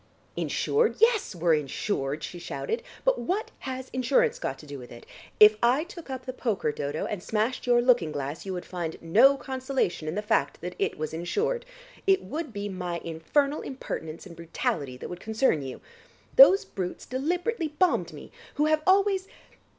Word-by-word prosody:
"Insured? 450 +1 +1
Yes, 450 - +3
we're 170 -1 +3
insured," 145 0 -2
she 175 - -6
shouted, 455 - -3 0.2
"but - - +3
what 390 +5 -2
has 260 0 -6
insurance 470 - +2
got - - -3
to - - -13
do 145 -1 -8
with 125 - -11
it? 120 - -11 0.3
If 210 0 +8
I 250 +5 +3
took 350 -4 -11
up 260 -1 -5
the 255 - -4
poker, 220 -11 -1
Dodo, 145 +1 -3
and 205 -4 -4
smashed 220 +6 -1
your 240 -1 +4
looking 240 -11 +3
glass, 145 +2 -4
you 195 - -5
would 180 - -5
find 170 -3 -5
no 235 +12 +5
consolation 260 - -2
in 155 - -2
the 210 - -2
fact 210 - +1
that 180 +1 -5
it - - 0
was 155 0 -4
insured. 445 - -1 0.4
It 385 0 +4
would 310 -2 -5
be 205 -1 -4
my 180 -3 -4
infernal 275 - 0
impertinence 165 -11 -6
and 175 -3 -11
brutality 155 -5 -3
that - - -7
would 180 - -7
concern 220 - +1
you. 135 -1 -7 0.5
Those 455 -6 +8
brutes 180 -2 -5
deliberately 345 - -1
bombed 325 +4 +1
me, - - -11 0.2
who 295 - +2
have 310 0 +3
always 385 0 +3
240 Hz, 180 wpm, -27 LUFS, -, 0.5 s, If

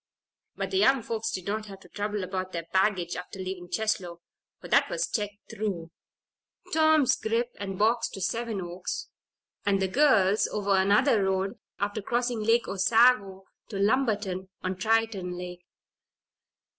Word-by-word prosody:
But - - -3
the 380 - +2
young 270 -8 +4
folks 225 0 -2
did 185 -2 -4
not 215 +1 -2
have 195 -1 -10
to - - -15
trouble 205 -1 -3
about 185 0 -4
their 170 -1 -4
baggage 190 -3 +1
after 180 +3 -7
leaving 185 -1 -6
Cheslow, 180 -3 -1 0.4
for - - -10
that - - +3
was - - -1
checked 205 -2 -4
through 195 -7 -4 0.8
Tom's 315 -3 +4
grip 230 +2 -1
and 195 -2 -4
box 230 +3 +2
to - - -6
Seven 225 +1 -2
Oaks, 175 +1 -5 0.5
and 200 -1 +2
the 190 - +1
girls' 210 -4 +4
over 200 -1 0
another 205 +4 +4
road, 190 0 -1 0.2
after 205 +1 -2
crossing 240 +2 -1
Lake 225 +2 +2
Osago, 200 -1 +3 0.3
to 205 - -5
Lumberton, 205 -4 0
on 185 0 -1
Triton 215 -3 0
Lake. 180 0 -8
205 Hz, 150 wpm, -27 LUFS, 185-225 Hz, 0.8 s, young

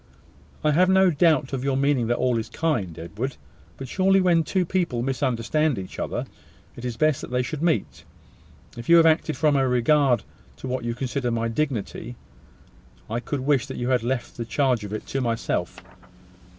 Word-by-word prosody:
"I 155 - +3
have 180 +5 +4
no 190 -1 +5
doubt 155 -3 +2
of 130 -1 -2
your 135 -1 0
meaning 135 -4 +1
all 125 +1 +1
that 115 - +1
is 110 0 -6
kind, 115 - -1
Edward: 105 +11 -5 0.4
but 135 - -7
surely 190 +6 +3
when 175 -3 +4
two 185 +3 0
people 170 -10 -1
misunderstand 135 +2 0
each 95 -1 -7
other, - - -3 0.5
it 120 - -10
is 125 -2 -4
best 155 -3 +2
that - - -7
they 125 0 0
should 155 +3 -5
meet. 160 - 0 0.7
If 120 +3 -8
you 170 - +8
have 165 - +6
acted 160 -1 +2
from 150 -2 +3
a 135 -1 +2
regard 125 -1 +3 0.3
to - - -7
what 130 -1 -2
you 120 0 -2
consider 130 0 -2
my 115 -1 -1
dignity, 125 -2 -3 1.0
I 115 - 0
could 135 +2 -4
wish 135 -1 +1
that 130 - -7
you 120 +1 -2
had 125 -2 +2
left 120 +2 -3
the 115 - -4
charge 125 -2 +1
of 100 - -7
it 110 - -5
to 135 - -3
myself." 115 -2 -2
130 Hz, 190 wpm, -24 LUFS, 120-155 Hz, 1.0 s, you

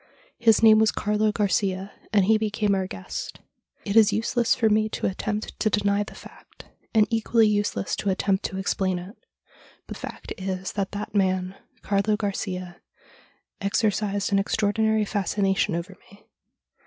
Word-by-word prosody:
His 225 -2 +4
name 220 -1 +8
was 220 -1 +4
Carlo 210 +1 0
Garcia, 200 -2 0 0.2
and 205 -4 +4
he 220 +2 +4
became 210 -1 0
our 190 -1 0
guest. 95 - -7 0.5
It 200 - -2
is 220 -1 +6
useless 230 +3 +1
for 230 -3 +2
me 215 0 +2
to - - -4
attempt 210 +3 -3
to 215 - +2
deny 200 0 +1
the 205 - -6
fact, - - -15 0.3
and 215 -2 +4
equally 225 0 +3
useless 205 -2 0
to 200 - -1
attempt 190 0 0
to 190 - -3
explain 190 -1 -1
it, 185 +5 -9 0.7
but - - -8
fact - - -8
it - - -7
is 185 0 -3
that 195 -2 -3
that 205 0 -5
man, 185 -2 +1 0.3
Carlo 210 +1 +1
Garcia, 185 -3 -4 0.8
exercised 205 -1 0
an 195 - +3
extra 205 +1 0
ordinary 220 0 +1
fascination 195 -3 0
over 175 +3 -5
me. 200 +1 -19
205 Hz, 160 wpm, -25 LUFS, 195-215 Hz, 0.8 s, name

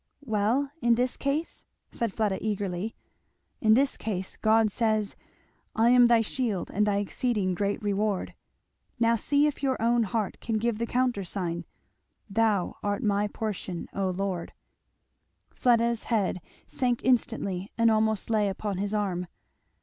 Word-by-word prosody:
"Well 230 +5 +1
in 235 -1 +4
this 250 +1 0
case?" 285 +4 -2 0.3
said 235 -3 -2
Fleda 205 -2 0
eagerly. 205 -1 -2 0.6
"In 220 -1 +5
this 275 +2 +2
case, 190 -4 -4
God 220 0 +3
says, 215 -2 0 0.6
'I 225 +2 +4
am 245 -1 +7
thy 235 -1 +5
shield, 225 -4 -2
and 210 +1 +2
thy 200 -1 +2
exceeding 205 -2 0
great 200 +3 -1
reward.' 205 -1 -1 0.7
Now 230 0 +4
see 285 +6 +2
if 295 -1 -1
your 265 -2 0
own 235 0 +3
heart 215 0 -2
can 225 -2 -1
give 230 0 -1
the 235 - -1
countersign, 195 -9 -1 0.6
'Thou 210 -3 +1
art 205 0 -1
my 205 -1 +2
portion, 200 -5 -4
O 195 -1 0
Lord!'" 185 -1 -3 1.0
Fleda's 235 -2 +2
head 200 -6 0 0.2
sank 245 -2 -1
instantly 200 -6 0
and 230 -1 +4
almost 220 0 +1
lay 210 -2 +2
upon 195 0 -3
his 205 +1 -1
arm. 185 -4 -1
215 Hz, 140 wpm, -27 LUFS, 200-235 Hz, 1.0 s, am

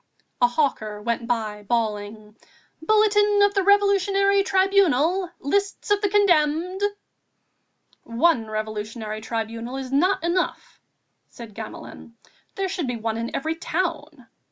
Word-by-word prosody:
A 245 - +6
hawker 240 -6 -1
went 235 +2 -3
by 215 -4 -2
bawling: 210 -1 -3 0.5
"Bulletin 415 +2 +3
of 405 0 +3
the 395 - +2
Revolutionary 400 0 +3
Tribunal!... 375 -3 +2
list 400 +8 -2
of 410 0 +3
the 410 - +1
condemned!" 360 -2 +2 1.2
"One 235 0 +1
Revolutionary 215 0 -5
Tribunal 230 +3 -4
is 265 -1 -6
not 340 +6 +2
enough," 345 +2 -2 0.5
said 230 -3 -12
Gamelin, 225 +1 -9 0.4
"there 390 0 -1
should 360 -6 -3
be 245 - -2
one 225 -1 -3
in 230 +1 -4
every 315 +3 -1
town 315 -5 -4
300 Hz, 120 wpm, -23 LUFS, -, 1.2 s, A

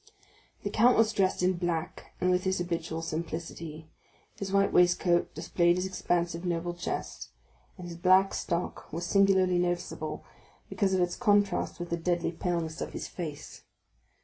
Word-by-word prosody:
The 200 - -2
count 240 +4 +5
was 225 0 +4
dressed 190 -3 +1
in 180 0 +2
black 175 -1 -3
and 180 - +2
with 180 0 +2
his 190 0 0
habitual 170 -2 -3
simplicity; 160 -1 -5 0.5
his 195 -1 -5
white 200 0 +3
waistcoat 175 0 +3
displayed 175 +1 +2
his 180 +1 -1
expansive 175 -2 -1
noble 175 -1 -1
chest 175 +1 -5 0.5
and 180 -1 -8
his 170 -1 -8
black 185 +2 +4
stock 175 0 -3
was 170 +2 -3
singularly 190 -1 +3
noticeable 175 -3 -3 0.4
because 195 -3 +1
of 185 - +2
its 175 0 0
contrast 205 -6 +1
with 175 0 -6
the 170 - +1
deadly 170 0 0
paleness 170 -2 -3
of - - -4
his - - -5
face. 155 -4 -7
175 Hz, 155 wpm, -29 LUFS, 170-185 Hz, 0.5 s, count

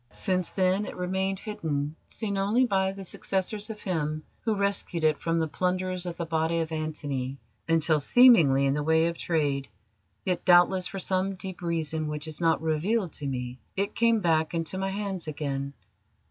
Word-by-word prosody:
"Since 185 -2 -1
then 190 +2 +1
it - - -7
remained 190 +2 -1
hidden, 155 -8 -3
seen 205 -3 -3
only 205 +6 +2
by 190 -4 +1
the 195 0 -8
successors 195 +3 -2
of 215 -1 -7
him 155 -4 -2 0.2
who 220 -2 +2
rescued 200 -4 -1
it 155 -1 +3
from 165 0 0
the 160 -1 +1
plunderers 185 +2 -2
of 170 -1 -5
the 170 - -3
body 165 +1 0
of 160 0 -4
Antony, 145 -4 -3 0.3
until, 160 -1 +3
seemingly 155 - +6
in 135 - +2
the 150 - -1
way 160 +2 +3
of 170 0 -1
trade, 145 -5 0 0.6
yet 180 -2 -1
doubtless 180 +1 +5
for - - -7
some 190 +1 0
deep 185 0 -7
reason 160 -2 -1
which 150 0 -4
is 155 0 -4
not 165 -1 +2
revealed 170 +4 0
to 145 - -4
me, 125 -1 -4 0.2
it 200 +1 -1
came 230 -2 +3
back 160 -2 +1
into 165 +3 -2
my 195 0 -1
hands 195 -3 -3
again. 140 -2 -3
170 Hz, 180 wpm, -27 LUFS, 155-190 Hz, 0.6 s, seemingly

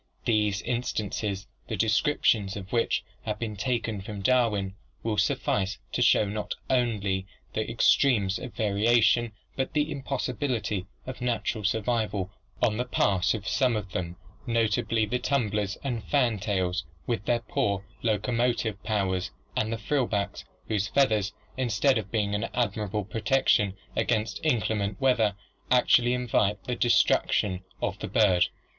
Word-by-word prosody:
These 105 -3 +1
instances, 105 -5 -2 0.2
the - - -3
descriptions 110 -3 +2
of 95 +1 -8
which 115 -1 +1 0.2
have 105 -1 -3
been 110 -1 -4
taken 110 -1 -1
from 100 0 -7
Darwin, 105 -6 +2 0.3
will 110 -2 0
suffice 100 -1 0
to - - -1
show - - +5
not 105 +1 -3 0.2
only 105 -7 0 0.3
the 110 +1 -2
extremes 115 -4 +3
of 125 - -8
variation 115 +2 +3 0.2
but 130 +2 -2
the 150 0 +1
impossibility 125 -7 -2 0.2
of 130 0 -7
natural 115 -3 -1
survival 105 -2 0 0.3
on 105 -1 +3
the 125 - -1
part 100 -5 +2
of 105 -2 -6
some 130 -4 +2
of 105 -3 -4
them, 90 -1 -3 0.3
notably 115 -1 +1
the 125 +4 -1
tumblers 105 -7 0
and 120 -6 -2
fantails, 100 - +1 0.2
with 115 -4 -1
their 120 0 +1
poor 100 -3 -1 0.2
locomo 115 +2 +1
tive 105 -4 -3
powers, 95 -4 -1 0.3
and 110 +1 0
the 115 - -1
frill 130 +4 0
backs, 100 -1 -2 0.2
whose 105 -1 0
feathers, 110 -6 +2 0.3
instead 130 +1 +2
of 100 -2 -7
being 105 -3 0
an 105 +2 -1
admirable 105 -3 -1
protection 105 -3 +2 0.2
against 110 -2 0
inclement 105 -8 0
weather, 115 -6 +3 0.3
actually 125 0 +4
invite 105 -4 +1
the 125 - -2
destruction 100 -5 +2 0.2
of - - -1
the - - -4
bird. 95 -4 +4
110 Hz, 140 wpm, -27 LUFS, 100-120 Hz, 0.3 s, show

